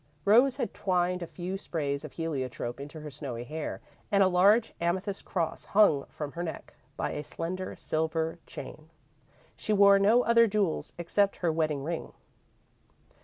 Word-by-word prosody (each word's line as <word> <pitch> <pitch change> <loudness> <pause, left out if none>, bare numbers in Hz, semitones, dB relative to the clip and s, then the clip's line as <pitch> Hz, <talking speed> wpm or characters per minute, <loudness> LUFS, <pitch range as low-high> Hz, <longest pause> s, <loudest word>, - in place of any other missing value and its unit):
Rose 245 +6 +5
had - - -2
twined 180 -1 0
a 170 - -4
few 185 +3 -5
sprays 140 -6 -2
of - - -8
heliotrope 130 -7 -3
into 145 +3 -8
her 150 -1 -7
snowy 130 -4 -6
hair 155 +4 -5 0.3
and 200 -1 +5
a - - +5
large 200 +5 +4
amethyst 190 +3 -1
cross 170 -4 -2
hung 195 -9 +4
from 150 -2 -6
her 170 - -5
neck 170 -2 -6 0.2
by - - -1
a 150 - -4
slender 185 +5 -5
silver 160 +1 -2
chain. 155 +1 -9 0.7
She 215 - -1
wore 200 -1 +7
no 220 +5 +5
other 230 0 +5
jewels 200 -5 -1
except 195 +4 +1
her 165 - +3
wedding 155 -3 0
ring. 165 +2 -4
170 Hz, 160 wpm, -29 LUFS, 155-200 Hz, 0.7 s, wore